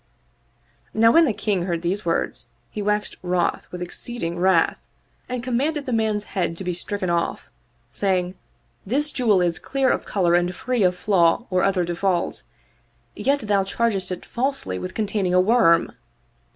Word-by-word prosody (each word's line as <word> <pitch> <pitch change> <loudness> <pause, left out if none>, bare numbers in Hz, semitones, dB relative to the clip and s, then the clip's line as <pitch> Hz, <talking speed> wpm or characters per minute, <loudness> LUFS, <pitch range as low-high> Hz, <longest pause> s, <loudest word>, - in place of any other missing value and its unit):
Now 225 +1 +6
when 330 +4 +6
the 265 - +1
King 200 -4 -1
heard 170 -1 -2
these 190 +4 -1
words 165 - -1 0.2
he 210 - -4
waxed 210 +1 -1
wroth 180 -1 -1
with 180 0 -5
exceeding 175 -2 -4
wrath 185 -2 +3 0.5
and 250 -1 -3
commanded 280 +4 -1
the 255 - -2
man's 220 -2 +1
head 170 -3 -1
to 190 - -6
be 180 -1 -2
stricken 185 +1 -3
off, 170 0 -2 0.4
saying, 185 -2 0 0.3
" - - -41
This 295 +2 +1
jewel 220 -9 +2
is 175 -2 +1
clear 270 -2 +1
of - - -1
color 180 -4 +1
and 175 +1 +2
free 250 +2 -1
of 180 -2 +3
flaw 180 +2 +2
or 185 0 +2
other 190 -3 +2
default; 175 +1 -1 0.7
yet 280 +1 +1
thou 205 -3 +1
chargest 195 -2 -1
it 180 - -5
falsely 240 - -2
with 185 - -6
containing 200 -4 0
a - - +6
worm 185 -4 +4
195 Hz, 165 wpm, -23 LUFS, 180-230 Hz, 0.7 s, Now